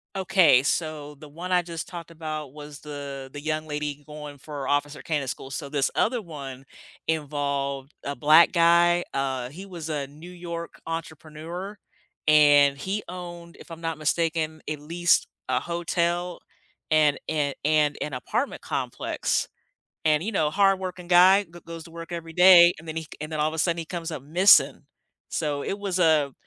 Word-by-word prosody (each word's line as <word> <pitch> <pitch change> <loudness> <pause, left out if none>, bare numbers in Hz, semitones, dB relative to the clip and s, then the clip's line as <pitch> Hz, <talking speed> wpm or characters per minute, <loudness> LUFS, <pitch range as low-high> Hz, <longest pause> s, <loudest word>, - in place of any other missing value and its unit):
Okay, 185 -8 +5
so 150 -1 -2
the 150 +1 -13
one 170 +5 -7
I 180 -1 +4
just 170 -1 -6
talked 170 -2 -8
about 155 -3 -6
was 150 -1 -10
the 140 -2 -7
the 145 - -8
young 155 +1 -2
lady 150 -1 -4
going 150 -2 -9
for 145 -2 -6
Officer 145 +1 -1
Candidate 145 -5 -2
school. 135 - -6
So 140 +1 -5
this 140 -2 0
other 235 +1 +1
one 140 -7 -9 0.4
involved 140 -2 -2
a 140 - -4
black 155 +6 +6
guy, 175 0 +4
uh, 130 -2 -2
he 180 +8 -10
was 170 -5 -7
a 145 -3 -2
New 155 +6 -12
York 170 -1 -7
entrepreneur 165 +4 -6 0.5
and 145 -2 +6
he 195 +8 -3
owned, 175 -1 -9
if - - -14
I'm 165 0 -9
not 165 -1 -3
mistaken, 155 0 -1
at 155 -1 -3
least 170 +4 +2 0.2
a - - +2
hotel 175 0 -1 0.5
and 155 -2 +3
and 145 -3 0
and 150 -1 +2
an 150 - -3
apartment 125 - -2
complex. - - -2 0.6
And, 155 0 +3
you 220 - -2
know, 155 -7 +1
hardworking 185 0 +1
guy 185 +3 +6
go 175 -2 -14
goes 165 -1 -9
to 165 - -14
work 165 +1 -9
every 165 -1 -6
day 180 0 +8
and 160 - -14
then 160 - -5
he 160 0 -4 0.2
and 155 +1 -6
then 155 - -3
all 150 - +2
of - - -8
a 160 - -4
sudden 170 +1 +1
he 165 - -4
comes 170 0 -5
up 155 -5 -6
missing. 175 +7 +5 0.5
So 145 -3 -2
it 195 - -3
was 195 -3 -2
a 155 -5 +3
160 Hz, 175 wpm, -25 LUFS, 145-175 Hz, 0.6 s, day